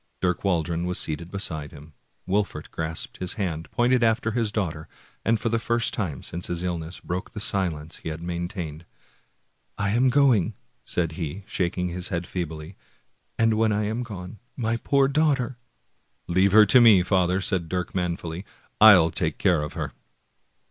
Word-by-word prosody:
Dirk 90 -2 0
Waldron 85 -2 0
was 90 - -1
seated 80 +2 -3
beside 80 -6 -3
him; 75 +2 -13 0.3
Wolfert 100 +2 -1
grasped 80 0 -4
his 90 -1 -3
hand, 85 -6 -3
pointed 120 0 +2
after 115 0 +2
his 115 -2 0
daughter, 85 -7 -3 0.4
and 115 0 +2
for 115 - -1
the 115 0 +1
first 115 +1 0
time 85 -10 -3
since 85 +1 -5
his 85 0 -3
illness 85 -1 -4
broke 90 +3 -4
the 105 - -5
silence 85 -6 -1
he - - -6
had 80 0 -5
maintained. 85 -2 -5 0.5
" - - -44
I 105 -1 0
am 125 +4 +3
going! 125 -9 +3
" - - -43
said 85 -2 0
he, 85 +3 -5
shaking 90 -1 -1
his 90 +1 -4
head 85 0 -3
feebly, 80 -1 -5 0.3
" - - -44
and 115 -1 +3
when 110 0 +2
I 105 +1 0
am 110 +3 -2
gone, 100 -4 -8 0.2
my 115 -2 0
poor 140 +3 +2
daughter 135 -4 +1 0.4
" - - -43 0.3
"Leave 95 +3 +3
her 105 +1 +8
to 125 +5 +7
me, 105 -6 +7
father!" 90 -1 +2
said 95 -4 -1
Dirk 90 0 -3
manfully; 85 -1 -3 0.4
"I'll 95 -7 +8
take 80 -2 -1
care 90 -6 +2
of 75 - -5
her! - - -4
90 Hz, 180 wpm, -25 LUFS, 85-110 Hz, 0.5 s, her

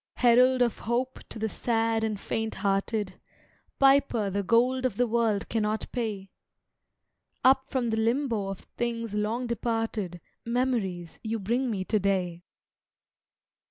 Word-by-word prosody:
Herald 250 +1 +5
of 235 - -1
Hope 250 +3 -2
to - - -6
the 220 0 -1
sad 225 0 0
and 215 -2 -1
faint 225 +1 -2
hearted, 195 0 -1 0.6
Piper 270 -7 +4
the 200 +1 0
gold 245 +5 +2
of 255 -6 -1
the 245 - +3
world 225 -3 +1
cannot 215 -1 -1
pay, 210 -6 -3 1.1
Up 265 +1 +4
from 245 -4 0
the 220 - 0
limbo 230 -2 0
of 195 -1 -5
things 230 -2 -4
long 215 +4 -1
departed 225 -6 -2 0.2
Memories 230 -8 -1
you 225 0 -2
bring 235 +6 0
me 200 -4 -2
to 215 +3 +1
day. 180 -3 -1
225 Hz, 135 wpm, -28 LUFS, 205-245 Hz, 1.1 s, Herald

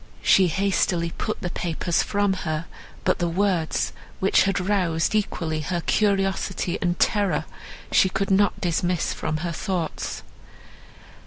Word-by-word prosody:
She 190 -2 +5
hastily 175 -1 +1
put - - -4
the 175 - -2
papers 170 0 0
from 205 -1 +1
her; 160 -3 -3 0.4
but - - +1
the 175 - +1
words, 180 -2 0 0.3
which 190 - +4
had 195 0 +1
roused 180 -4 +1
equally 165 -7 -1
her 175 +3 -2
curiosity 195 -2 0
and 175 -1 0
terror, 190 -7 +1 0.5
she 190 - +5
could 195 +1 -1
not 200 +1 +3
dismiss 175 0 0
from 155 -1 -2
her 170 - -1
thoughts. 175 -1 -3
180 Hz, 135 wpm, -24 LUFS, 170-195 Hz, 0.5 s, She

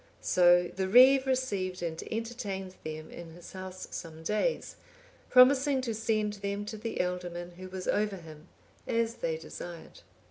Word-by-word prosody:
So 175 -1 +5
the 190 0 -1
reeve 260 +5 +7
received 200 -9 -1
and 165 -1 -3
entertained 220 -5 -4
them 155 0 -6
in 165 -1 -10
his 175 - -12
house 185 0 -7
some 160 -1 -7
days, 215 - -1 0.5
promising 265 +2 +6
to 235 -3 -2
send 215 -1 0
them 200 0 -4
to 215 +1 -6
the 225 +1 -5
ealdorman 180 -1 -3
who 185 0 -8
was 185 0 -6
over 210 -1 +1
him, 160 -3 -12 0.4
as 230 0 +1
they 160 -1 -2
desired. 170 +1 -9
190 Hz, 150 wpm, -30 LUFS, 175-230 Hz, 0.5 s, reeve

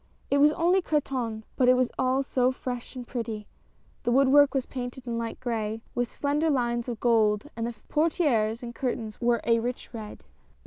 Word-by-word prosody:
It 280 - +4
was 295 +1 +6
only 355 +4 +3
Cretonne, 255 -9 -1
but 250 -2 +4
it 255 - +7
was 255 -1 +1
all 260 +1 +2
so 255 -1 +2
fresh 250 -1 -6
and 250 -1 -6
pretty. 225 -4 -4 0.6
The 240 - -1
woodwork 275 +2 +5
was 265 -1 +1
painted 250 0 -6
in 235 -1 -2
light 230 -1 -4
gray, 225 -3 -3
with 245 -1 -1
slender 295 +3 0
lines 240 -3 0
of 235 - -4
gold, 220 +1 +2
and 230 0 -2
the 240 - -5
portieres 260 -8 +1
and 235 0 -6
curtains 230 -4 -3
were 240 -1 +2
a 230 0 +4
rich 245 +1 -4
red. 215 -2 -8
245 Hz, 185 wpm, -27 LUFS, 230-270 Hz, 0.6 s, it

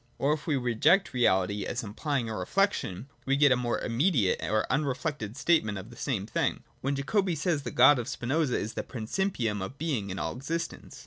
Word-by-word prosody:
Or, 145 +2 +2
if 150 -1 -5
we 155 - +2
reject 130 - +3
reality, 100 -4 +2
as 120 +5 -3
implying 120 +4 -2
a 110 - -4
reflection, 115 - -1 0.2
we 135 - +3
get 140 0 +5
a - - +6
more 120 -1 -1
immediate 120 - +1
or 110 0 +1
unreflected 140 -5 -2
statement 135 - +2
of 100 +5 -9
the - - -12
same 115 -6 -2
thing, - - -1 0.2
when 140 +2 0
Jacobi 180 +6 0
says 160 +2 0
that - - -5
the - - -12
God 145 -3 +7
of 120 - -4
Spinoza 140 +2 0
is 110 - -4
the - - -2
principium 115 - -2
of 130 +9 -7
being 140 -11 -2
in 95 - -4
all - - -3
existence. 165 +6 -5
130 Hz, 200 wpm, -28 LUFS, 110-150 Hz, 0.2 s, God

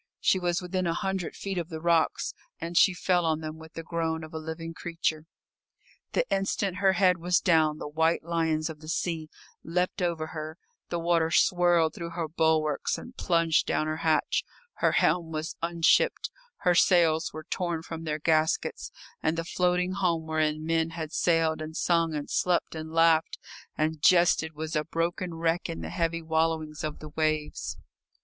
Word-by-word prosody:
She 190 - +3
was 175 0 -1
within 185 0 -1
a 165 - 0
hundred 190 -3 -2
feet 195 -2 -3
of 170 -1 -5
the 160 -2 -5
rocks, 170 -1 +1 0.3
and 170 +1 -5
she 190 - +6
fell 180 0 +1
on 160 -1 0
them 155 0 -6
with 160 0 -13
the 165 - -6
groan 160 -1 -2
of 155 - -10
a 160 - -4
living 160 +1 -6
creature. 165 -2 -3 0.9
The - - +1
instant 195 -1 -1
her 195 -1 +3
head 180 -2 +3
was 175 +1 +2
down 160 -4 +3
the - - -6
white 160 +3 +1
lions 160 -2 0
of 160 -2 -7
the 155 - -12
sea 160 -1 -2 0.3
leapt 180 +4 -1
over 170 -3 -1
her, 155 0 -6 0.3
the 175 - -1
water 165 -1 +2
swirled 175 -1 +3
through 170 -1 -6
her 165 -2 -2
bulwarks 155 -2 +1
and 250 - -10
plunged 165 -3 +2
down 155 - +1
her 155 0 -2
hatch; 160 -1 +1 0.3
her - - +2
helm 170 -2 +2
was 155 0 -4
unshipped, 170 -1 +2 0.3
her 180 -2 +3
sails 170 -3 +4
were 155 0 -8
torn 170 -3 -2
from 165 0 -7
their 155 -2 -2
gaskets, 155 0 0 0.3
and 160 +1 0
the 165 - -2
floating 180 +1 +1
home 175 -4 0
wherein 155 -1 0
men 165 0 +1
had 160 -1 -6
sailed 165 -2 +2
and 155 +1 -6
sung 165 -2 +1
and 145 -1 -4
slept 180 -2 +1
and 160 0 -6
laughed 165 0 +3 0.4
and 155 0 -1
jested 170 -2 +4
was 155 +2 -5
a 150 - +1
broken 170 +2 -2
wreck 165 +1 0
in 80 - -5
the 80 0 -6
heavy 165 - -1
wallowings 160 0 -1
of 155 -1 -3
the 155 - -9
waves. 155 -1 -2
165 Hz, 180 wpm, -28 LUFS, 155-175 Hz, 0.9 s, she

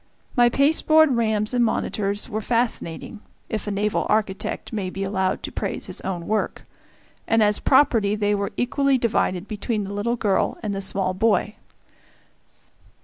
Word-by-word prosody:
My 240 -2 +5
pasteboard 310 +1 +4
rams 220 -1 0
and 245 -1 +3
monitors 205 -2 -1
were 215 +1 -3
fascinating 230 -4 -2 0.3
if 220 -1 -3
a - - -1
naval 205 +1 0
architect 210 +1 -1
may 200 -4 -2
be 195 +1 -4
allowed 190 -1 -1
to - - -4
praise - - -4
his - - -5
own 175 -3 -4
work 215 0 -2 0.6
and 225 -1 +3
as 210 0 +2
property 230 -7 +3
they 205 -1 +1
were 200 -1 -1
equally 275 +2 +2
divided 205 -5 0
between 215 0 -2
the 195 +1 -6
little 220 +4 -1
girl 205 -5 0
and 210 -2 -2
the 195 - -3
small 190 -1 0
boy. 210 +1 +1
210 Hz, 155 wpm, -23 LUFS, 200-235 Hz, 0.6 s, My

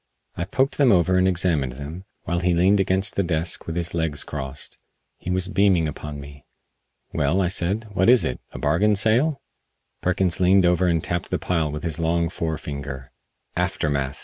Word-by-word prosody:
I 85 - -3
poked 130 +10 0
them 135 -4 +5
over 95 -1 +3
and 95 - +3
examined 85 -8 +1
them, 75 +7 -8 0.2
while 85 0 -1
he 90 0 +1
leaned 95 +4 +3
against 95 0 +2
the - - +1
desk 85 -2 -1
with 80 - -4
his 85 -1 -1
legs 80 -3 0
crossed. 65 -1 -6 0.4
He - - -7
was 90 0 +1
beaming 95 -5 +2
upon 75 -1 -7
me. 70 -1 -12 0.7
"Well," 75 +7 +1
I 90 -3 +1
said, 100 +4 0
"what 95 +3 +2
is 125 -1 +6
it 60 - -3
a - - -10
bargain 90 +9 +2
sale?" 120 +9 +2 0.6
Perkins 90 -1 +1
leaned 95 +1 +4
over 90 +1 +2
and 85 -2 +1
tapped 85 -1 -3
the - - 0
pile 80 -4 -1
with 75 0 -6
his 80 -2 -2
long 85 0 +1
fore 80 -2 -3
finger. 70 -4 -7 0.4
"Aftermath!" 70 -2 -1
85 Hz, 185 wpm, -23 LUFS, 75-95 Hz, 0.7 s, is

